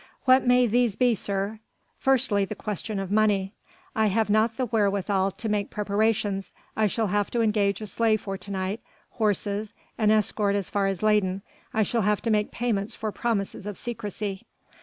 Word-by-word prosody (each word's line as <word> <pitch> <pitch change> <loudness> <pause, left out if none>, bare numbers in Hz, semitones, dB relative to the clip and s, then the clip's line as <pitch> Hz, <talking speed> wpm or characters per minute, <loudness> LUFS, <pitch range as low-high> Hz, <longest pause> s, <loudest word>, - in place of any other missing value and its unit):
"What 260 0 +5
may 250 0 +5
these 240 -2 +2
be, 245 +1 +3
sir?" 200 +1 -2 0.4
"Firstly 250 -6 +2
the 205 +2 -4
question 210 +1 -4
of 195 -1 -4
money. 205 -2 +2 0.4
I 220 -1 +3
have 210 +1 +1
not 220 +2 +2
the 255 - 0
wherewithal 200 -3 +1
to 220 +4 -6
make 210 -1 0
preparations. 205 -1 0 0.2
I 215 -1 +3
shall 225 +3 0
have 205 0 0
to 235 - 0
engage 210 -2 +1
a - - -4
sleigh 220 +1 +2
for 195 -2 -5
to 195 - -10
night, 195 +2 -2 0.3
horses, 210 0 -1 0.2
an 215 -1 +3
escort 210 -1 +2
as 200 -3 -2
far 200 -1 +1
as 195 0 -2
Leyden. 200 -3 +2 0.3
I 220 -4 +2
shall 230 +2 0
have 210 0 +1
to 230 - +1
make 210 -1 +2
payments 220 -4 -1
for 215 -1 -3
promises 205 -3 -2
of 205 - -5
secrecy...." 210 -4 -5
210 Hz, 180 wpm, -26 LUFS, 200-225 Hz, 0.4 s, What